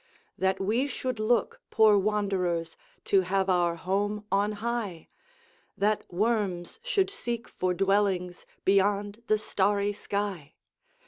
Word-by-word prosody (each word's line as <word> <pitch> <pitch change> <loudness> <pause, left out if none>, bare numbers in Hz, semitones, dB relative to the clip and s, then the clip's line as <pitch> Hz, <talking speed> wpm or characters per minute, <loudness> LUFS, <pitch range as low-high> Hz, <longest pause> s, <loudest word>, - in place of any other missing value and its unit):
That 190 0 0
we 225 +8 +1
should 255 -3 -4
look, 220 0 +1
poor 220 -1 +5
wanderers, 190 -5 0 0.3
To 195 - +4
have 190 +1 +1
our 175 -2 +2
home 200 +4 -1
on 205 +2 +2
high! 210 -5 -4 0.7
That 210 0 0
worms 200 - -1
should 405 -6 +1
seek 240 - -4
for 180 0 -1
dwellings 195 -2 0 0.2
Beyond 200 +2 +2
the 215 - +3
starry 205 0 0
sky! 200 -7 -4
200 Hz, 120 wpm, -28 LUFS, 190-215 Hz, 0.7 s, poor